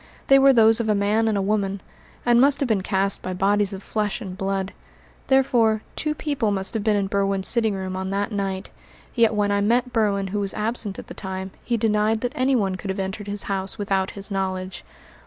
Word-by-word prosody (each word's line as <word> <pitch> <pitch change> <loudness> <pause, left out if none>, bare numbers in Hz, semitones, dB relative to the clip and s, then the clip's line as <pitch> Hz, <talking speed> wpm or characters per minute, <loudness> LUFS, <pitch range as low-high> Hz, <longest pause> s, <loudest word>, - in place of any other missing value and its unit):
They 275 0 +7
were 275 0 +7
those 225 -2 +5
of 225 -2 -1
a 210 - +3
man 210 +3 +1
and 215 -2 +1
a 195 - 0
woman, 200 -1 -1 0.5
and 240 0 +5
must 280 0 +4
have 275 - 0
been 215 -5 +1
cast 195 0 -1
by 185 - -4
bodies 200 +2 +1
of 195 0 -7
flesh 210 -1 -2
and 190 -6 -7
blood. 195 0 -2 0.5
Therefore, 235 -5 +3
two 305 -1 -1
people 280 -8 -1
must 195 -1 -2
have 220 -3 -2
been 215 -1 +2
in 200 -1 +1
Berwin's 195 -1 0
sitting 225 -4 +3
room 190 -1 -4
on 190 0 -3
that 200 +2 -2
night; 195 -2 -3 0.4
yet 230 -3 +3
when 205 -1 +1
I 200 0 +1
met 240 +4 +1
Berwin 200 -4 +1
who 205 +2 -2
was 200 -1 -1
absent 215 -2 -3
at - - -8
the - - -10
time 190 -1 -6
he 235 - 0
denied 215 0 +1
that 245 +1 -2
anyone 255 -9 +1
could 195 - -7
have 190 - -2
entered 195 +2 -4
his 205 0 -4
house 195 0 -3
without 195 -2 0
his 200 +1 -2
knowledge. 190 -1 -3
205 Hz, 220 wpm, -23 LUFS, 195-225 Hz, 0.5 s, They